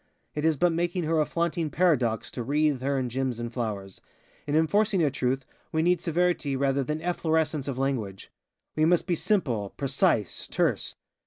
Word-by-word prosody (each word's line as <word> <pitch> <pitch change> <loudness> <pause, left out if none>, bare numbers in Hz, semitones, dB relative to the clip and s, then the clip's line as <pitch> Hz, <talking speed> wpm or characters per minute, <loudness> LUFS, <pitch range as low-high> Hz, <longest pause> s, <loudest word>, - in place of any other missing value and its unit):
It 150 - -3
is 160 -2 +3
but 175 +4 +3
making 175 +2 -1
her 160 0 +2
a 150 - 0
flaunting 170 -1 -1
paradox 135 -10 +1
to - - -5
wreathe 145 +1 +1
her 140 +1 0
in 130 -1 -1
gems 125 -1 -2
and 120 0 -5
flowers. 105 -6 -4 0.5
In 145 - 0
enforcing 195 +4 +3
a 145 - +2
truth 130 +1 -1 0.3
we 160 0 +1
need 175 0 +2
severity 170 -4 0
rather 135 0 +1
than 155 +4 -3
efflorescence 160 -4 0
of 135 -3 -3
language. 120 -8 -2 0.4
We 155 - +2
must 175 +1 +3
be 180 - 0
simple, 130 - 0
precise, 135 - 0
terse. - - 0
150 Hz, 175 wpm, -27 LUFS, 130-170 Hz, 0.5 s, is